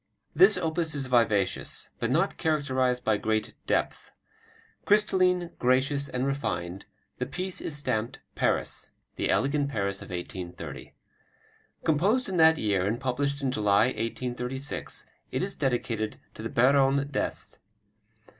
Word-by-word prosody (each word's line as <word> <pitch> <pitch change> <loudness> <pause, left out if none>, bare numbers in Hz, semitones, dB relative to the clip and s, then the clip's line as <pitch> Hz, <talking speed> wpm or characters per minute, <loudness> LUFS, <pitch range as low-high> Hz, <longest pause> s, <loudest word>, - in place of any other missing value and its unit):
This 370 +3 +7
opus 160 -1 0
is 140 -2 -1
vivacious, 115 -6 +1
but 115 - -1
not 165 +9 +1
characterized 130 -6 0
by 110 -1 +2
great 110 +1 -1
depth. - - -1 0.7
Crystalline, 185 -4 +3
gracious, 135 +3 +2
and 125 +1 -1
refined, 100 -10 -3 0.3
the 125 - -2
piece 185 +6 -4
is 145 - -3
stamped 115 -5 -2
"Paris," - - 0 0.2
the - - -1
elegant 140 +1 +1
Paris 100 -6 0
of - - -10
1830. 90 -3 -7 0.9
Composed 195 - +2
in 190 -2 -2
that 160 0 +6
year 100 -3 +1
and 115 +3 -1
published 140 +2 -1
in 130 - +1
July, 105 0 +3
1836, 125 +3 -4 0.3
it - - -1
is - - -2
dedicated 115 -4 -2
to - - -9
the 115 - -4
Baronne 135 +3 +3
D'Est. - - -3
130 Hz, 130 wpm, -27 LUFS, 110-145 Hz, 0.9 s, This